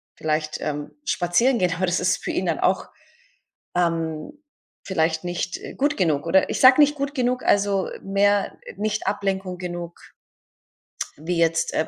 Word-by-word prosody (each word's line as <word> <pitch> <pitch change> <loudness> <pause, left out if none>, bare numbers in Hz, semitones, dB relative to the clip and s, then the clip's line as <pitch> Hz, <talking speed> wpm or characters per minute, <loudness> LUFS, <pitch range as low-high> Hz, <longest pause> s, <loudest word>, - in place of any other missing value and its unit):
Vielleicht, 155 0 -2
ähm, 145 -1 -4
spazieren 235 +6 +2
gehen, 180 -2 +2
aber 185 +2 0
das 175 0 0
ist 180 +1 0
für - - -2
ihn 185 - -1
dann 165 -3 0
auch, 190 +1 +1 0.9
ähm, 165 - -2 0.4
vielleicht 160 -3 0
nicht, 175 0 -3
äh, - - -9
gut 290 +2 0
genug. 155 -6 +1
Oder 190 +3 +3
ich - - -2
sage 260 +2 +7
nicht 295 0 +4
gut 280 -1 -3
genug, 250 -2 0
also, 200 -1 +2
mehr 200 +1 +1 0.2
nicht 210 +1 -2
Ablenkung 195 -2 -2
genug 175 -1 -6 1.2
wie 165 +4 -3
jetzt, 165 0 +1
äh, 160 - 0
180 Hz, 155 wpm, -23 LUFS, 165-205 Hz, 1.2 s, sage